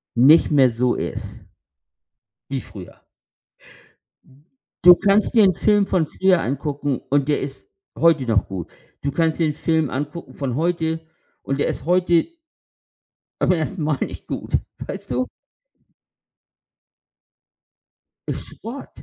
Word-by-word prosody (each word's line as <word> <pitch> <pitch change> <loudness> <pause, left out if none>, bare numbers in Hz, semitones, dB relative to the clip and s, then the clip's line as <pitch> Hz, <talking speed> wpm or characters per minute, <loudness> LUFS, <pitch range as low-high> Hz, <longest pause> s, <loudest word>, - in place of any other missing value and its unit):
nicht 140 +7 +6
mehr 135 -4 +5
so 120 +2 0
ist - - -6 1.0
wie 135 -1 -3
früher. 95 -4 -12 1.2
Mhm. 140 +4 -24 0.4
Du 180 0 +9
kannst 205 +5 +2
dir 220 - +7
'n 190 -2 +5
Film 205 +3 +2
von 165 -5 +1
früher 185 -1 +2
angucken 140 +1 -2
und 140 0 +2
der 145 - +1
ist 140 - -7 0.3
heute 165 -5 +4
noch 110 -4 +1
gut. 95 -4 -6 0.3
Du 140 - -2
kannst 165 +1 0
dir 160 - +3
'n 150 - -1
Film 160 -1 0
angucken 145 +5 -5
von 130 -4 -3
heute 160 0 -1 0.4
und 135 +1 -2
der - - +1
ist - - -4
heute 175 - +2 1.1
beim - - +3
1. 165 +1 -2
Mal 150 -2 0
nicht - - -5
gut, - - -5 0.3
weißt - - -7
du? 125 +1 -1 3.0
Ist - - -4
Schrott, 245 +5 -8
155 Hz, 130 wpm, -21 LUFS, 135-175 Hz, 3.0 s, Du